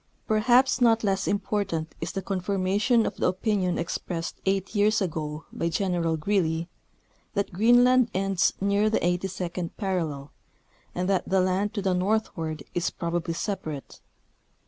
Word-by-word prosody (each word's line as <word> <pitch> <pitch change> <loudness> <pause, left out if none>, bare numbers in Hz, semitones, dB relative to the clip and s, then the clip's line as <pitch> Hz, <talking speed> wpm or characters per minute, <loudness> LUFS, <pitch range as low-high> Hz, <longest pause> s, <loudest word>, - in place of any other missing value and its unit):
Perhaps 245 +4 +3
not 230 -2 +4
less 195 -2 0
important 195 -6 -1
is 165 - -3
the 195 - -4
confirmation 200 +5 +1
of - - -3
the - - +1
opinion 185 -1 0
expressed 170 0 -4
eight 195 0 0
years 210 +1 +3
ago 155 -5 -3
by 165 - -1
General 170 -2 0
Greely 165 -2 0 0.7
that 200 -2 -1
Greenland 245 +4 +5
ends 195 -1 +1
near 200 +2 +2
the 220 - +1
82d 180 -1 -2
parallel, 165 -9 -2 0.6
and 180 +1 -1
that 195 -1 0
the 190 0 +3
land 185 +3 0
to 205 - -2
the 190 -1 +2
northward 180 -6 -1
is 175 -1 0
probably 170 0 -3
separate. 170 -6 -5
190 Hz, 140 wpm, -26 LUFS, 170-205 Hz, 0.7 s, Greenland